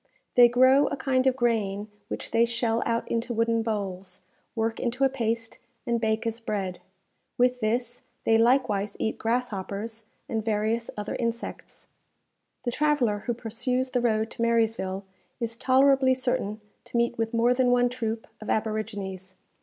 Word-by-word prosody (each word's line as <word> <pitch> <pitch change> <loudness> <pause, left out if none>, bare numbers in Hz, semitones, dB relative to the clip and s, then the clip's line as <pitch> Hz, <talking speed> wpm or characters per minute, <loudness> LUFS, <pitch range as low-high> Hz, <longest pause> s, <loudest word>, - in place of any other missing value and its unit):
They 245 -1 +8
grow 260 +3 +5
a - - -2
kind 260 -1 +1
of 260 - +3
grain 215 -5 0 0.2
which - - -5
they 230 0 +4
shell 235 -1 0
out 230 0 0
into 235 +1 -2
wooden 230 0 +2
bowls, 195 -4 -4 0.3
work 225 0 -1
into 245 +3 -1
a 270 - +5
paste, 230 -3 -2 0.3
and 235 -2 0
bake 220 0 0
as 230 0 -2
bread. 195 -5 -3 0.6
With 250 0 +3
this, 240 +2 -1 0.2
they 225 - +4
likewise 225 -4 +2
eat 220 - -1
grasshoppers 225 -1 -3 0.2
and 220 -1 -2
various 220 +2 0
other 210 0 -3
insects. 235 0 -5 0.8
The 240 - -1
traveller 265 -7 +1
who 240 - 0
pursues 250 +3 -2
the 250 - +1
road 220 -1 +1
to - - -7
Marysville, 225 -4 +1 0.4
is 230 -1 -2
tolerably 265 +1 +4
certain 225 -5 -2 0.2
to - - -3
meet 235 0 +1
with 225 0 0
more 235 +1 +3
than 250 0 +2
one 245 0 +4
troop 230 -2 -3 0.2
of 215 - -7
aborigines. 205 -4 -3
230 Hz, 155 wpm, -27 LUFS, 220-245 Hz, 0.8 s, They